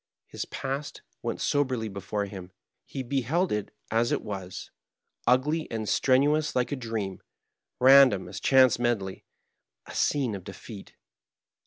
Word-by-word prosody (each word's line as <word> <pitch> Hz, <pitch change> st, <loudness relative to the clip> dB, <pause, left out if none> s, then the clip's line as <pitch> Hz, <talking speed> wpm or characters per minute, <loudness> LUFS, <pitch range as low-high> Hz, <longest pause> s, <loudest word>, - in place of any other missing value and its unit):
His -, -, -6 dB
past 135 Hz, +2 st, -5 dB, 0.2 s
went -, -, -3 dB
soberly 130 Hz, -6 st, 0 dB
before 100 Hz, +1 st, -3 dB
him; 95 Hz, -2 st, -9 dB, 0.4 s
he 135 Hz, -, -5 dB
beheld 140 Hz, -, 0 dB
it 105 Hz, -1 st, -2 dB, 0.2 s
as 115 Hz, +2 st, +2 dB
it -, -, 0 dB
was, 95 Hz, -3 st, -6 dB, 0.6 s
ugly 150 Hz, +6 st, +2 dB
and 110 Hz, -2 st, -4 dB
strenuous 145 Hz, +6 st, +2 dB
like 125 Hz, +1 st, +1 dB
a -, -, 0 dB
dream, 115 Hz, -7 st, -4 dB, 0.6 s
random 130 Hz, -6 st, +7 dB
as 95 Hz, -, -7 dB
chance 130 Hz, -1 st, +5 dB
medley 110 Hz, -6 st, -1 dB, 0.3 s
— -, -, -58 dB
a -, -, -10 dB
scene 135 Hz, -6 st, +1 dB
of 95 Hz, -2 st, -6 dB
defeat. 105 Hz, +1 st, -10 dB
120 Hz, 140 wpm, -27 LUFS, 100-135 Hz, 0.6 s, random